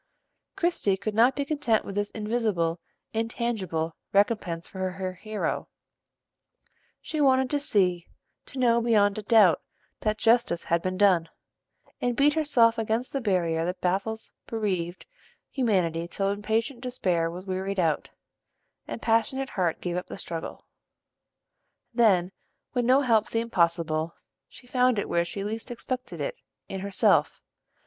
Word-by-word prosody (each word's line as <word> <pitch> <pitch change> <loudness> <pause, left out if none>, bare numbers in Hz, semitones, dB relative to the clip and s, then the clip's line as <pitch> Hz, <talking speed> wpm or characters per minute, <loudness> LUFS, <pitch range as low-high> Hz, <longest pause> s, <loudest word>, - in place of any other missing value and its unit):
Christie 340 - +1
could 210 +2 -3
not 235 +5 +4
be 280 - -1
content 280 -7 +1
with 200 - -6
this 205 +1 -1
invisible, 210 -7 -1 0.3
intangible 220 -8 -2 0.2
recompense 195 -5 +1
for 190 -1 -3
her 185 -1 -4
hero: 215 +3 -3 1.3
she 310 -2 -3
wanted 265 -2 +3
to 290 - +2
see, 185 - +1 0.4
to 275 - -7
know 235 -2 +3
beyond 215 -3 +3
a - - -4
doubt, 205 -7 +5 0.4
that 215 0 0
justice 230 -7 +3
had 170 0 +1
been 185 +1 -2
done; 185 -5 +4 0.7
and 245 -1 0
beat 290 +3 +4
herself 255 -8 +3
against 225 +3 -1
the 275 - -1
barrier 170 -6 +1
that 180 +2 -3
baffles 195 +5 -2
bereaved 185 -6 -2 0.5
humanity 180 - 0
till 195 +3 -1
impatient 225 +5 -1
despair 185 -10 0
was 180 +3 -8
wearied 190 +1 -2
out, 160 -4 +1 0.8
and - - -6
passionate 240 +4 +1
heart 175 -4 -1
gave 175 -1 -2
up 180 - -4
the - - -7
struggle. 165 -1 -6 1.3
Then, 195 -7 +3 0.4
when 245 -2 0
no 260 +2 +5
help 225 -5 +3
seemed 230 0 -2
possible, 165 -2 +1 0.3
she 250 - -14
found 250 -1 +2
it 205 - -1
where 170 - +1
she 195 +3 -5
least 220 +4 -4
expected 250 +1 -5
it, - - -3 0.3
in 195 - -5
herself. 200 0 +2
210 Hz, 140 wpm, -27 LUFS, 180-235 Hz, 1.3 s, doubt